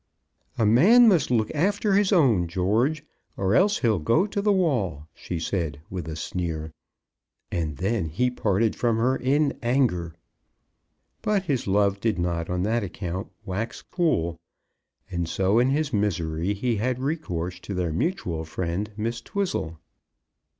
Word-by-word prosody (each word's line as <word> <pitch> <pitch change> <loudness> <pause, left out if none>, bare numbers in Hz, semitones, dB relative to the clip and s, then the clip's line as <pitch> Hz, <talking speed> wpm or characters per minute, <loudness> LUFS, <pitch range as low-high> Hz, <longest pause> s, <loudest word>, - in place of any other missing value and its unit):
"A 110 - +2
man 195 - +7
must 175 -10 +4
look 110 -3 +1
after 200 +6 +1
his 200 0 +3
own, 125 - +4
George, 110 - 0 0.3
or 95 +1 +1
else 200 - +4
he'll 110 -5 +2
go 115 - +2
to 200 -1 -2
the 205 0 +3
wall," 120 - 0
she 90 - -5
said, 80 -3 -2
with 90 -4 -5
a 80 - -5
sneer. 80 -1 -4 0.8
And 80 -4 -2
then 100 0 0
he 125 +11 0
parted 110 -2 +1
from 115 -2 +1
her 125 +3 +2
in 140 +3 +1
anger. 115 - +1 1.1
But 210 -3 +1
his 140 - -1
love 100 0 +2
did 110 -1 0
not 85 -1 -2
on 90 0 -1
that 115 +4 +1
account 90 -1 -5 0.2
wax 105 +5 -4
cool, 85 - 0 0.7
and 85 -2 -2
so 95 +6 +2
in 125 +2 +3
his 145 0 0
misery 90 -3 0
he 115 +2 -1
had 125 +4 0
recourse 90 - -3
to 100 - -6
their 90 -3 -1
mutual 85 - -2
friend, 85 +5 -3
Miss 115 +2 -2
Twizzle. 175 - -3
105 Hz, 150 wpm, -25 LUFS, 85-135 Hz, 1.1 s, man